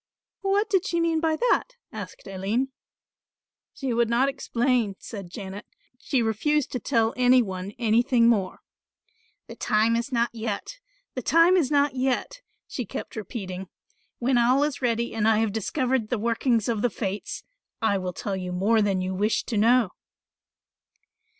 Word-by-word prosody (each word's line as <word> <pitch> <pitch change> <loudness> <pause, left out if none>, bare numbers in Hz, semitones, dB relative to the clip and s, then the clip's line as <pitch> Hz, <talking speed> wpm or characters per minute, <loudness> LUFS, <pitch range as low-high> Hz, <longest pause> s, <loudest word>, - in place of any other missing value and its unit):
"What 400 +2 +1
did 385 -1 +1
she 340 - 0
mean 330 -1 +2
by 320 -1 +1
that?" - - +1 0.2
asked - - -8
Aline. 200 +7 -1 1.1
"She 265 -3 -2
would 235 -1 +2
not 250 +4 +3
explain," 245 -5 0
said 200 -6 -8
Janet; 195 +2 -8 0.3
"she 260 -3 0
refused 260 +7 0
to 250 - -2
tell 230 -2 +1
any 250 0 +5
one 190 -1 -6
anything 235 +1 +3
more. 200 -6 +1 0.8
'The - - -11
time 220 +1 +2
is 235 +4 -2
not 235 -1 +1
yet, 225 - -4 0.3
the 255 - -3
time 330 +8 +5
is 330 -8 +2
not 285 -1 +3
yet,' 265 - -1 0.3
she 250 - -4
kept 210 - -7
repeating; 190 -3 -6 0.5
'when 250 0 +2
all 255 +4 +4
is 295 -2 -2
ready 235 -1 0
and 220 -1 +1
I 220 -1 +4
have 220 -1 +1
discovered 245 +1 -1
the 245 - 0
workings 230 0 +1
of 225 -3 0
the 245 - +2
fates, 200 -1 -4 0.4
I 205 -4 +1
will 185 -1 -3
tell 195 +2 -4
you 180 -1 -4
more 205 +5 +2
than 195 -3 +1
you 185 0 -2
wish 210 +4 +1
to 230 - -4
know. 230 0 +4
235 Hz, 165 wpm, -25 LUFS, 210-265 Hz, 1.1 s, any